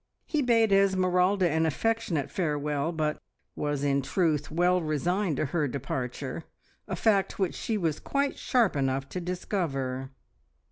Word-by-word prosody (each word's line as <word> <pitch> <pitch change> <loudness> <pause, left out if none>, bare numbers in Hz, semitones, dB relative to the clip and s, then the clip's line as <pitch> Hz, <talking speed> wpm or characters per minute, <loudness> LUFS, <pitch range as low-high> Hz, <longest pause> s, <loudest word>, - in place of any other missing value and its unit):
He 305 -2 0
bade 230 -4 +3
Esmeralda 190 -1 +3
an 160 0 +1
affectionate 180 -4 -1
farewell, 150 -2 -1
but 155 -2 -2 0.3
was 145 -1 -2
in 140 -1 +2
truth 150 0 0
well 180 +3 +2
resigned 165 +2 0
to - - +1
her 150 +1 0
departure 130 +2 -4 0.4
a - - -2
fact 200 -4 +2
which 190 -3 0
she 225 - -2
was 165 -6 -1
quite 280 0 -1
sharp 240 - +2
enough 135 -1 0
to 180 - -4
discover. 135 -8 -2
165 Hz, 140 wpm, -28 LUFS, 145-195 Hz, 0.4 s, bade